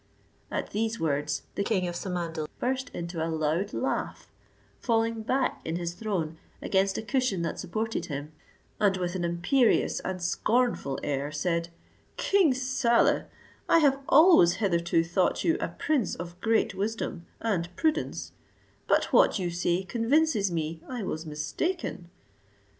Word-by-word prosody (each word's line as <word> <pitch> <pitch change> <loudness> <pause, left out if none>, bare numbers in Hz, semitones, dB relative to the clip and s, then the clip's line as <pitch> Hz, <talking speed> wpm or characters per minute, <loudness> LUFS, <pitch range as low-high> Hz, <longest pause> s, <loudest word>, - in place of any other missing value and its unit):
At - - -3
these 225 +2 -1
words 150 -1 -1
the 200 - -1
king 190 -4 0
of 175 - -3
Samandal 170 -4 -3
burst 260 +2 -1
into 170 -1 -4
a 165 - -1
loud 160 +5 0
laugh, 260 - -2 0.5
falling 225 -1 +1
back 260 +5 0
in 160 - -3
his 170 0 -3
throne 175 -5 -3 0.2
against 195 0 +1
a - - -3
cushion 220 -5 0
that 165 - -3
supported 220 +5 -3
him, 145 0 -5 0.5
and 200 -2 +3
with 175 -1 -2
an 185 -2 -2
imperious 180 +9 +2
and 185 -1 -4
scornful 200 - 0
air, 145 0 -2
said, 170 +2 -1 0.5
"King 390 -7 +3
Saleh, 255 -2 +2 0.4
I - - +6
have 280 -4 +4
always 305 - +7
hitherto 170 -4 +1
thought 175 +2 +1
you 330 - +3
a - - -1
prince 280 -10 -1
of 175 +1 -8
great 225 -3 +2
wisdom, 195 -3 -3
and 180 -7 -1
prudence; 315 -1 -1 0.6
but - - +2
what - - +5
you 180 -3 -2
say 175 +1 0
convinces 230 - +2
me 160 -1 -3
I 245 -4 -4
was 160 -3 -4
mistaken. 170 - -3
190 Hz, 145 wpm, -28 LUFS, 170-230 Hz, 0.6 s, always